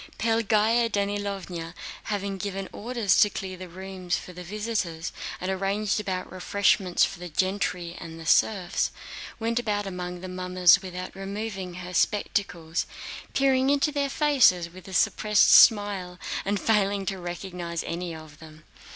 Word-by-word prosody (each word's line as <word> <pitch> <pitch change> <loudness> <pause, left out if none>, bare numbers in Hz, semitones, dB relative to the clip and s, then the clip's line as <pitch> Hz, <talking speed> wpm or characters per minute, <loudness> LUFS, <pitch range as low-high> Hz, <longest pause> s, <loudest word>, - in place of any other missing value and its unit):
Pelagéya 225 +1 +2
Danílovna, 200 -5 -3 0.3
having 200 -2 -3
given 195 0 -4
orders 230 -3 +1
to 210 - +6
clear 190 -1 -5
the 185 0 -9
rooms 185 0 -4
for 180 - -9
the 180 0 -8
visitors 190 -4 -3 0.3
and 185 +1 -2
arranged 195 +2 0
about 185 -3 -3
refreshments 185 0 +2
for - - -7
the 180 0 -7
gentry 180 0 -1
and 165 -1 -9
the 165 - -9
serfs, 185 +2 +2 0.5
went 230 +1 0
about 210 -3 -1
among 180 -2 -5
the 185 - -6
mummers 180 0 +4
without 185 -1 -7
removing 195 -2 -5
her 180 0 -7
spectacles, 180 -4 0 0.5
peering 270 -1 +3
into 285 +1 +2
their 285 -1 0
faces 255 - +3
with 185 +2 -13
a 190 - -9
suppressed 210 +3 +4
smile 205 -5 +5 0.3
and 200 +1 0
failing 200 -2 +1
to 190 0 -3
recognize 175 -1 -5
any 175 +1 -4
of 155 -1 -12
them. 155 -2 -14
190 Hz, 145 wpm, -26 LUFS, 180-210 Hz, 0.5 s, to